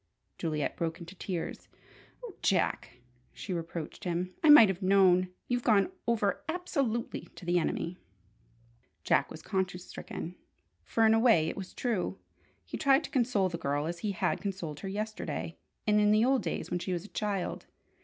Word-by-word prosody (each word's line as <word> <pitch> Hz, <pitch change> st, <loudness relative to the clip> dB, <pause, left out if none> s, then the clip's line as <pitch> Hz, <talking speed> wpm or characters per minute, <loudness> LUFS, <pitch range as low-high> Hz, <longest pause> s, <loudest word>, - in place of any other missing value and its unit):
Juliet 155 Hz, -3 st, -1 dB
broke 165 Hz, +1 st, -2 dB
into 170 Hz, +1 st, -9 dB
tears. 180 Hz, -2 st, -5 dB, 0.6 s
"Oh, 445 Hz, -, -8 dB
Jack," 165 Hz, -8 st, 0 dB, 0.3 s
she 190 Hz, -, -5 dB
reproached 165 Hz, +2 st, -5 dB
him. 180 Hz, 0 st, -2 dB
"I 310 Hz, -, +5 dB
might 295 Hz, -7 st, +10 dB
have 190 Hz, 0 st, -2 dB
known! 185 Hz, -1 st, +4 dB, 0.2 s
You've 245 Hz, 0 st, 0 dB
gone 215 Hz, -, +3 dB, 0.2 s
over 215 Hz, -4 st, +1 dB
absolutely 275 Hz, -9 st, -2 dB
to 180 Hz, -, -11 dB
the 175 Hz, 0 st, +3 dB
enemy!" 170 Hz, +2 st, -2 dB, 1.0 s
Jack 140 Hz, -, +2 dB
was 160 Hz, -, -10 dB
conscience 185 Hz, -2 st, -2 dB
stricken, 175 Hz, -, -7 dB, 0.5 s
for 225 Hz, -, +2 dB
in 220 Hz, -, +6 dB
a 225 Hz, -, +4 dB
way 220 Hz, -10 st, +4 dB
it -, -, -5 dB
was 190 Hz, -2 st, -7 dB
true. 195 Hz, -, -1 dB, 0.5 s
He 85 Hz, -, -5 dB
tried 275 Hz, +2 st, +4 dB
to -, -, -7 dB
console 235 Hz, -7 st, +2 dB
the 170 Hz, -1 st, -5 dB
girl 145 Hz, -1 st, -1 dB
as 170 Hz, +1 st, -4 dB
he 205 Hz, +2 st, -2 dB
had -, -, 0 dB
consoled 180 Hz, -7 st, -4 dB
her 195 Hz, -, -5 dB
yesterday, 215 Hz, +2 st, -4 dB, 0.3 s
and 210 Hz, 0 st, +4 dB
in 210 Hz, -, +4 dB
the 215 Hz, +2 st, +5 dB
old 265 Hz, 0 st, +3 dB
days -, -, -4 dB
when 175 Hz, -, 0 dB
she 185 Hz, +1 st, -3 dB
was 175 Hz, +1 st, -3 dB
a -, -, -12 dB
child. 205 Hz, -3 st, -3 dB
190 Hz, 175 wpm, -30 LUFS, 170-220 Hz, 1.0 s, might